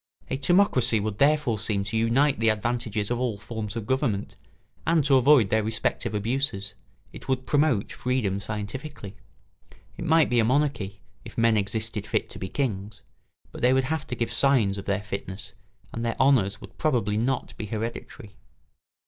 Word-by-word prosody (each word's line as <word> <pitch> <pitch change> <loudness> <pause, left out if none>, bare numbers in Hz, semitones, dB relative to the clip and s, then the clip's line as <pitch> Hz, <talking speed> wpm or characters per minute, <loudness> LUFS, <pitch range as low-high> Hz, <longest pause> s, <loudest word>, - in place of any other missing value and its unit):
A 135 - 0
timocracy 135 - +3
would 105 0 -3
therefore 140 -6 +3
seem 100 -2 -1
to 105 +2 -5
unite 120 +4 +2
the 115 0 +3
advantages 110 -1 -1
of 120 - 0
all 120 -5 -1
forms 105 0 -6
of 115 -3 -4
government 120 -5 -1 0.5
and 165 -2 +4
to 140 0 +2
avoid 130 -5 +5
their 110 - +3
respective 110 0 -1
abuses. 105 -2 -1 0.4
It - - -11
would 130 -1 -1
promote 145 -8 +2
freedom 125 -6 -1
scientifically. 105 +2 -6 0.8
It 170 - -5
might 160 -1 +4
be 120 -1 +2
a - - +4
monarchy, 115 -6 0 0.2
if - - -12
men 115 -1 +4
existed 105 +1 -2
fit - - -1
to - - -9
be 95 - -5
kings; 105 -6 -3 0.5
but - - -9
they 125 +1 +4
would 130 0 +3
have 155 +3 -2
to 125 - -3
give 115 -1 -2
signs 115 -8 +3
of 100 - -8
their 100 +1 -1
fitness 100 0 -6 0.4
and 115 - -4
their 115 -1 -2
honours 110 -8 +3
would - - -13
probably 120 -9 +1
not 125 +3 -1
be 105 - -6
hereditary. 110 -1 -6
115 Hz, 175 wpm, -26 LUFS, 105-130 Hz, 0.8 s, avoid